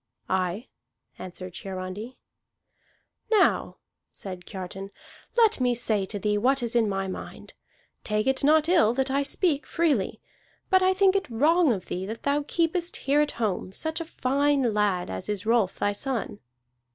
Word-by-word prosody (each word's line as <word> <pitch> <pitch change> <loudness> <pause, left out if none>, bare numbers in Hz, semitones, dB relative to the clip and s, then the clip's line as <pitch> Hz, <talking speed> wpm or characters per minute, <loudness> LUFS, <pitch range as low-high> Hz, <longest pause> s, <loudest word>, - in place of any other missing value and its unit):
"Aye," 185 +5 -1 0.5
answered 185 0 -8
Hiarandi. 195 +5 -6 1.1
"Now," 435 -3 +2 0.3
said 185 -2 -8
Kiartan, 195 +1 -7 0.5
"let 450 - +4
me 245 -1 +2
say 215 -4 0
to 205 - -4
thee 210 +1 0
what 265 +3 +2
is 235 0 -2
in 225 -3 +3
my 195 -1 -2
mind. 185 - -8 0.5
Take 215 0 0
it 265 +1 +1
not 310 +2 +4
ill 285 -11 +4
that 265 0 0
I 275 +1 +2
speak 290 +1 +1
freely. 295 - 0 0.5
But 375 0 +5
I 375 0 +3
think 390 0 +4
it 390 - 0
wrong 305 +6 +3
of 190 -5 -2
thee 185 +1 -4
that 225 +2 -7
thou 285 +1 +1
keepest 340 +1 0
here 285 +2 +4
at 300 - 0
home 200 -4 -2
such 315 - -3
a - - -4
fine 275 -4 +1
lad 200 - 0
as 95 - -5
is 205 -2 -2
Rolf 225 -4 +2
thy 205 - +1
son." 225 -1 -3
235 Hz, 165 wpm, -26 LUFS, 195-295 Hz, 1.1 s, But